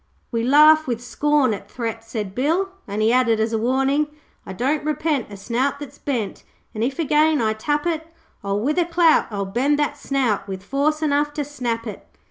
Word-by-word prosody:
'We 230 -1 -1
laugh 305 +3 +6
with 240 -3 -1
scorn 285 0 +1
at 200 - -8
threats,' 225 -2 -5
said 210 -4 -4
Bill, 325 - 0 0.2
and 210 +1 -2
he 225 +2 +3
added 240 -3 +3
as 220 +1 0
a 220 - +1
warning 270 +5 +1 0.4
'I 190 - -5
don't 275 +9 0
repent 300 -5 -1
a 200 - -8
snout 245 +8 -1
that's 285 -1 -10
bent, 230 -9 -3 0.3
And 220 - -2
if 265 +3 -1
again 305 -1 +3
I 220 -1 +1
tap 295 +8 -1
it, 320 -2 -2 0.4
Oh, 200 0 -1
with 275 - 0
a 345 - +3
clout 335 -1 +3
I'll 200 -2 -3
bend 255 +9 +1
that 290 -1 -1
snout 250 -9 0
With 190 -1 -6
force 295 +7 0
enough 295 0 +1
to 295 -1 -3
snap 240 -5 -3
it.' 215 - -8
265 Hz, 200 wpm, -22 LUFS, 225-295 Hz, 0.4 s, laugh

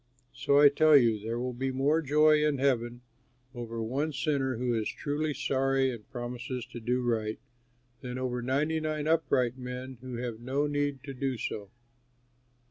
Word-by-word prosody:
So, 140 +2 +3
I 145 0 +9
tell 155 +1 +6
you, 115 -5 +3
there 115 +3 -3
will 125 0 -2
be 130 +2 -2
more 140 +5 +2
joy 150 +1 +4
in 150 -2 +2
heaven 120 -3 0 0.5
over 115 -2 -5
one 140 +7 -1
sinner 135 -3 0
who 125 0 0
is 110 -2 -1
truly 150 +1 -2
sorry 135 -1 +1
and 115 -4 -10
promises 125 0 -5
to 120 - -6
do 125 +2 0
right 110 -3 -1 0.6
than 125 0 -5
over 125 -1 -2
ninety 145 +6 0
nine 155 -1 -2
upright 130 -6 +1
men 125 0 -6
who 130 -1 -6
have 120 -2 -4
no 135 +4 -1
need 145 -2 -1
to 140 -1 -6
do 130 -1 -2
so. 105 -2 -5
130 Hz, 170 wpm, -29 LUFS, 120-145 Hz, 0.6 s, I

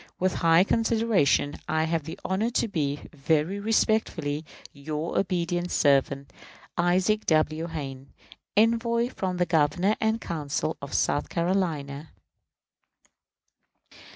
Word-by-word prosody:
With 185 0 +1
high 165 +1 +6
consideration, 220 - +2
I 155 0 +1
have 160 -2 -1
the 165 +4 -7
honor 200 +5 0
to 240 - 0
be, 145 -7 -2
very 155 +6 0
respectfully, 200 -8 0 0.3
your 150 +3 -4
obedient 175 -1 -1
servant, 140 -2 +2 0.4
ISAAC 185 +5 +2
W. 155 +1 +2
HAYNE, 135 -5 -6 0.5
_Envoy 235 +2 +2
from 185 -2 -2
the 180 - +2
Governor 170 +5 +2
and 220 +1 +1
Council 155 -3 -3
of 140 0 -6
South 145 - +1
Carolina. 165 -5 -1
170 Hz, 110 wpm, -26 LUFS, 150-195 Hz, 0.5 s, high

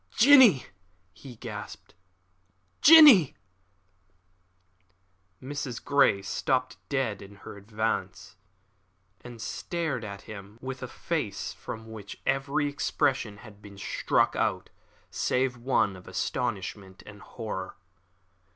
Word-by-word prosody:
"Jinny!" 250 - +7 0.5
he 125 +5 -12
gasped 110 -3 -9 0.9
"Jinny!" 290 - +8 2.0
Mrs. 135 -3 -6
Grey 120 -9 +3
stopped 130 +5 -1
dead 135 -7 -1
in 100 0 -12
her 100 - -11
advance, 100 -4 -4 0.9
and 120 -1 -11
stared 155 +1 -4
at 100 -2 -7
him 100 0 -11
with 130 0 -7
a - - -5
face - - -4
from 110 0 -9
which 105 -2 -10
every 140 +2 0
expression 130 -6 -1
had 105 -1 -15
been 100 -1 -13
struck 95 - 0
out, - - -2 0.4
save 125 0 0
one 120 -5 0
of 90 - -14
astonishment 95 -1 -4
and 105 -1 -13
horror. 105 -5 -7
115 Hz, 105 wpm, -27 LUFS, 100-135 Hz, 2.0 s, Jinny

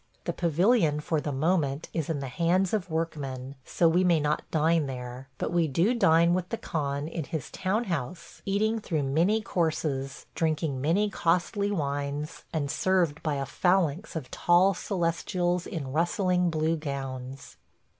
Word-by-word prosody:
The - - -2
pavilion 170 -1 +2
for 150 0 -1
the 145 - -3
moment 150 0 0
is 165 -2 -2
in 150 -4 -1
the 135 - -4
hands 175 - +1
of 195 -4 -1
workmen, 140 -5 -3
so 170 - +2
we 175 +3 +3
may 175 -3 +4
not 150 0 0
dine 160 -1 +2
there; 125 0 -6
but - - -2
we 170 -2 +3
do 170 - +2
dine 170 -7 +4
with 180 0 -1
the 230 - -2
Khan 145 -4 -2
in 165 0 -4
his 160 -5 -5
town 200 +5 0
house, 170 - -5
eating 215 +3 +1
through 160 -8 -1
many 170 +11 +2
courses, 155 -7 -1
drinking 155 -4 -1
many 195 +8 +2
costly 180 +5 +1
wines, 145 -3 -3
and 145 -3 -1
served 175 -5 +1
by 155 -2 -1
a 140 0 -2
phalanx 180 - +1
of 150 -6 -5
tall 180 +3 +4
Celestials 175 -1 -1
in 140 -6 -5
rustling 180 +3 +1
blue 160 0 0
gowns. 135 -3 -6
165 Hz, 160 wpm, -28 LUFS, 145-180 Hz, -, may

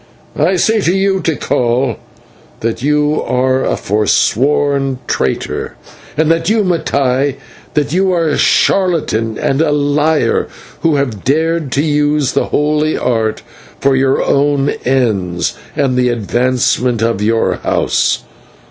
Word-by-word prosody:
I 170 +6 +2
say 220 +5 +2
to 185 +1 +1
you, 195 0 +1
Tikal, 125 -6 0 0.6
that 115 +1 -2
you 150 +2 +1
are 130 +1 0
a - - -1
foresworn 135 +6 +1
traitor, - - -2 0.4
and 155 0 +2
to 165 - +4
you, 220 -1 +2
Mattai, 140 -6 0 0.4
that 145 -1 0
you 190 +1 +2
are 170 -2 +1
a 150 - +1
charlatan 150 - +1
and 135 +3 0
a 160 - +2
liar, 150 +2 +1 0.3
who 160 -2 +1
have 125 -8 -2
dared 160 +1 0
to 140 - +1
use 150 -2 +1
the - - +1
holy 150 +1 0
art 115 -3 -1 0.4
for 135 -1 +2
your 135 0 +2
own 140 0 +1 0.2
ends, 100 -10 0 0.2
and 135 -3 0
the 125 0 +2
advancement 120 +1 0
of 115 -3 0
your 115 +2 +1
house. - - 0
140 Hz, 130 wpm, -14 LUFS, 125-155 Hz, 0.6 s, to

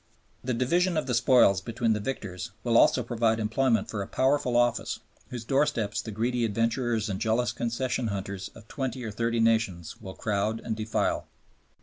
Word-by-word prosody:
The 125 -1 -1
division 170 +8 +2
of 155 - 0
the 130 - -2
spoils 115 -6 +5
between 115 0 0
the 105 - -1
victors 100 -7 -4
will - - +1
also - - +5
provide 115 -1 +1
employment 110 0 +1
for 105 - -4
a 100 - -4
powerful 130 -2 +1
office, 120 -1 +1 0.3
whose 120 -2 -6
doorsteps 115 -6 +1
the - - -8
greedy 120 +3 -1
adventurers 115 +1 0
and 95 -2 -3
jealous 115 +2 +1
concession 120 +1 -2
hunters 100 -1 -4
of 115 -1 -14
twenty 130 -2 -4
or 110 - -4
thirty 115 +2 -1
nations 110 -8 0
will 95 -3 -8
crowd 105 +1 -1
and 110 - -3
defile. 110 0 -1
115 Hz, 175 wpm, -27 LUFS, 105-125 Hz, 0.3 s, spoils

